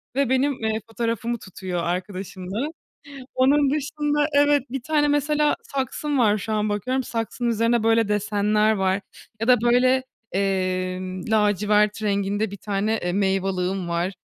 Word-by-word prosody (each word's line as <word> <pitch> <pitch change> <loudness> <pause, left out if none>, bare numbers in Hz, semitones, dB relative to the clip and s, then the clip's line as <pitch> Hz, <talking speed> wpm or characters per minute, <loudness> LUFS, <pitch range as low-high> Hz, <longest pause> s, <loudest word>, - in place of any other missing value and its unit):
ve 275 -3 +1
benim, 265 +2 +2
ııı, 220 -2 -2
fotoğrafımı 230 0 -2
tutuyor 185 -2 -5
arkadaşımla. 185 - -4 0.7
Onun 275 +2 +4
dışında 295 0 0
evet, 290 -1 +4
1 270 -1 -4
tane 295 +2 +1
mesela 295 +1 +2
saksım 280 +2 -2
var 215 -3 +3
şu 220 +2 -4
an 215 0 0
bakıyorum, 250 +6 -1
saksının 235 0 -2
üzerinde 230 +1 +2
böyle 225 -1 +3
desenler 210 +1 +2
var 190 -1 +1 0.4
ya 225 - -1
da 250 -3 +6
böyle, 255 +2 +3 0.3
emm, 185 -1 -1
lacivert 210 0 +2
renginde 200 0 0
1 200 - -7
tane, 205 +2 -1
e 175 -5 -2
meyveliğim 190 -1 0
var. 170 +3 -1
215 Hz, 140 wpm, -23 LUFS, 195-255 Hz, 0.7 s, da